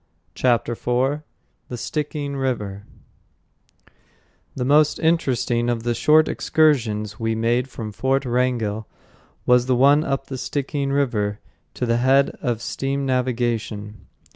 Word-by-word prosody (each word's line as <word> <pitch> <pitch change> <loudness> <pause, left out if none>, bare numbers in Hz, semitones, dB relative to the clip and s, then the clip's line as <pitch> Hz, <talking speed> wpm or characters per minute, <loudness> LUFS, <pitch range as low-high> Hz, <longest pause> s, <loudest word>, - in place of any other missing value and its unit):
Chapter 120 -2 +1
IV 125 +5 0 0.5
The 125 - -4
Stickeen 145 +1 -3
River 105 -7 -3 1.7
The 125 - -2
most 150 +2 +4
interesting 130 -7 +1
of 115 -2 -1
the 120 0 0
short 155 +6 +4
excursions 110 -9 +1
we 115 -1 -1
made 120 +3 +1
from 110 -4 -6
Fort 135 +5 0
Wrangell 120 -4 -1 0.6
was 125 0 +4
the 130 - +3
one 140 +4 +5
up 135 -1 -2
the 130 -2 -6
Stickeen 140 +1 -2
River 110 -7 0 0.4
to - - -2
the 115 0 +1
head 135 +3 +3
of 120 -2 -2
steam 135 +1 -2
navigation. 120 -5 -2
125 Hz, 125 wpm, -22 LUFS, 115-140 Hz, 1.7 s, one